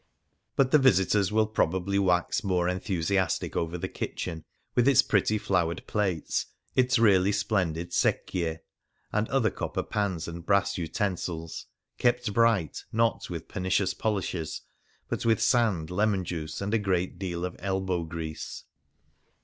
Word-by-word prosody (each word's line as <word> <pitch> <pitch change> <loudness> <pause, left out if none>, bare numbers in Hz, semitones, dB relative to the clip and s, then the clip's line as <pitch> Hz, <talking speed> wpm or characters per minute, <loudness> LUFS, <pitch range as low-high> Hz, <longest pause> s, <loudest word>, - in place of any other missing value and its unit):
But 130 -1 +3
the 150 - +7
visitors 100 -5 +3
will 110 0 +3
prob 105 -5 +1
ably 100 +2 0
wax 90 +5 +1
more 90 -3 +1
enthusiastic 90 -1 0
over 85 +1 -1
the - - -3
kitchen, 80 -1 -5 0.3
with 120 +1 +3
its 140 -3 +6
pretty 105 +1 +2
flowered 90 -5 0
plates, 95 -7 -1 0.3
its 130 0 +4
really 100 -4 +5
splendid 90 -5 -1
secchie, 80 -3 0 0.5
and 105 +1 0
other 130 -5 +2
copper - - -3
pans 95 -6 -2
and 85 0 -7
brass 100 +1 +2
utensils, 85 -2 -3 0.3
kept 120 -3 +1
bright, 115 -8 +2
not 115 0 +1
with 85 -3 -6
pernicious 95 0 0
polishes, 95 -7 -2 0.5
but - - -3
with 115 -1 +3
sand, 110 -8 +2
lemon 100 0 +1
juice, 80 -2 -5
and 100 +2 -2
a 115 - +3
great 95 -3 -1
deal 90 -2 -3
of 90 - -5
elbow 95 -2 -1
grease. 80 -1 -6
95 Hz, 140 wpm, -28 LUFS, 85-105 Hz, 0.5 s, the